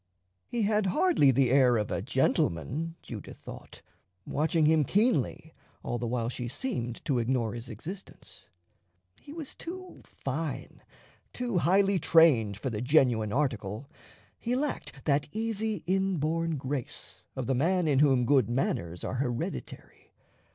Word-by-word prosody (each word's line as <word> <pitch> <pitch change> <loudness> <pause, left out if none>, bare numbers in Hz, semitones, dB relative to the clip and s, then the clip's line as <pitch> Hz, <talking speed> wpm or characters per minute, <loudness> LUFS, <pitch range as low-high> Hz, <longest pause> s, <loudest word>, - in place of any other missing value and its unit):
He 235 -2 -1
had 210 -1 +2
hardly 190 - +4
the 130 -1 +3
air 130 -3 +5
of 105 -1 -2
a - - -1
gentleman, 150 - 0
Judith 110 -5 -8
thought, - - -11 0.4
watching 155 +1 +1
him 155 0 +4
keenly 195 - +1 0.3
all 120 - -2
the 120 - -2
while 115 -1 -1
she 120 0 -4
seemed 120 - -4
to 130 -4 +1
ignore 115 -2 0
his 120 +1 -7
existence. 170 - -10 0.7
He - - -12
was 310 -3 -6
too 370 +2 -9
fine, 145 +2 -5 0.5
too 240 -7 -1
highly 195 +2 +3
trained 140 - +5
for 125 +5 -3
the 105 -1 -3
genuine 125 -6 +3
article; 120 -1 -2 0.5
he 240 +2 -1
lacked 265 - -3
that 145 -1 +2
easy 220 -3 -2
inborn 165 -4 0
grace 135 -1 -5
of 130 - -3
the 135 - +1
man 170 +6 +2
in 140 -3 +3
whom 135 -4 +4
good 130 -4 +3
manners 90 -9 -1
are - - -3
hereditary. 120 - -5
140 Hz, 140 wpm, -29 LUFS, 120-185 Hz, 0.7 s, air